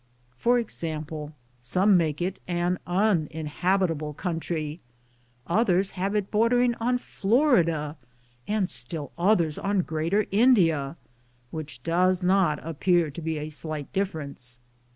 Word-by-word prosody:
For 240 - +3
example, 155 -8 -4 0.3
some 185 +11 +3
make 160 -2 +1
it 185 +2 -3
an 175 0 0
uninhabitable 165 -3 0
country, 165 -2 -3 0.6
others 190 0 +2
have 195 +2 -2
it 205 -2 -1
bordering 240 +3 +3
on 245 +2 +1
Florida, 195 - +1 0.5
and 210 -3 +1
still 145 +4 -6
others 170 -4 +2
on 200 -2 +1
Greater 165 +7 0
India, 175 - +3 0.6
which 150 -6 -7
does 180 +2 +2
not 180 -4 +3
appear 165 0 +1
to 160 - -7
be 160 0 -2
a 150 +1 -5
Blight 155 -3 -5
difference. 145 -11 -4
175 Hz, 115 wpm, -26 LUFS, 155-195 Hz, 0.6 s, For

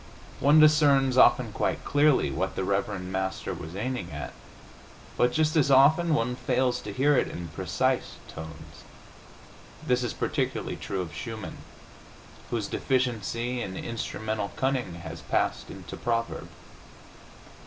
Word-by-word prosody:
One 145 +3 +6
discerns, 145 -4 +5
often 130 - +5
quite - - -2
clearly, 145 -1 +3
what 95 +2 -2
the - - -1
reverend 100 -1 -2
Master 95 0 -2
was 80 +3 -8
aiming 110 -4 -3
at, 70 -1 -6 0.8
but 125 - +3
just 155 +2 +1
as 145 -3 +3
often 150 +5 +5
one 125 0 0
fails 125 0 0
to 105 - -6
hear 140 +7 +3
it - - +2
in 85 -1 -6
precise 75 - -1
tones. 80 0 -10 1.0
This 125 0 +2
is 120 - -2
particularly - - -2
true 95 -1 -4
of 85 -4 -7
Schumann, 110 +6 -6 0.9
whose 115 -3 -1
deficiency 120 -1 -1
in 95 -4 -5
instrumental 110 -3 -3
cunning 130 -9 -1
has 80 -1 -8
passed - - -1
into - - -8
proverb. 115 -1 -2
120 Hz, 130 wpm, -27 LUFS, 95-135 Hz, 1.0 s, One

